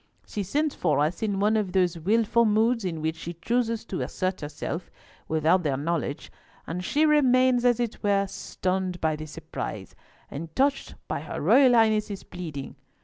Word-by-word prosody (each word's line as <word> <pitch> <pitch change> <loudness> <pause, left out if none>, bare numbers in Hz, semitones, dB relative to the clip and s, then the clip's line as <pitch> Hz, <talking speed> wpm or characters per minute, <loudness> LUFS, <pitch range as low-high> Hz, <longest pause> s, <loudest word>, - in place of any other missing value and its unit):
She 210 - -4
sent 290 +10 0
for 155 -5 +1
us 155 +4 0
in 205 -3 -1
one 210 +2 +3
of 205 -4 -1
those 180 -3 +2
wilful 225 +7 +2
moods 225 +2 +2
in 165 -4 -3
which 160 0 0
she 170 +1 -7
chooses 230 +5 -1
to 190 - -4
assert 185 0 -2
herself 155 +3 -5 0.4
without 160 +4 +3
their 145 -5 -1
knowledge, 150 -1 -3 0.3
and 180 +2 -4
she 300 - +2
remains, 255 -4 +4
as 245 -1 +4
it 235 -2 -3
were, 200 -1 +2
stunned 185 -1 -3
by 160 -1 +1
the 155 0 -7
surprise, 155 - -6 0.4
and 160 +3 -7
touched 275 +1 +1
by - - -2
her - - -6
Royal 260 -3 +5
Highness's 215 -3 +2
pleading. 155 -6 -7
195 Hz, 170 wpm, -26 LUFS, 165-230 Hz, 0.4 s, Royal